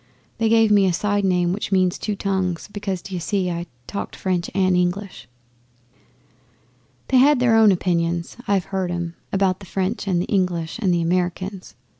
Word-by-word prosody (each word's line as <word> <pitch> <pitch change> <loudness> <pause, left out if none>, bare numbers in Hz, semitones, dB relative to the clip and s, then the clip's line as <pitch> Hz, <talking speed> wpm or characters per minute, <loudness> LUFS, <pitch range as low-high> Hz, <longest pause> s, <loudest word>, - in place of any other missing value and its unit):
They 225 -1 +2
gave 225 -1 +4
me 200 -2 +5
a 180 - +1
side 205 +3 0
name 180 -2 +2
which 205 0 -4
means 185 -2 +2
"Two 210 - -2
Tongues," 190 -4 -2
because, 195 -3 -4
d'ye 185 -2 -5
see, 185 0 -1
I 170 +1 -4 0.2
talked 200 - -5
French 180 -2 -2
and 185 -2 +3
English. 180 +2 -2 1.8
'They 260 - +4
had 280 +1 +5
their 245 -2 +3
own 220 -2 +6
opinions 170 -2 -1
(I've 195 -3 +1
heard 190 -2 -1
'em) 175 -1 -3 0.2
about 190 -1 +1
the 195 - -12
French 195 +4 -2
and 180 -3 +1
the 175 - -1
English, 180 -1 -1
and 195 -5 +1
the 170 -1 +1
Americans. 180 +2 -2
185 Hz, 175 wpm, -22 LUFS, 175-200 Hz, 1.8 s, own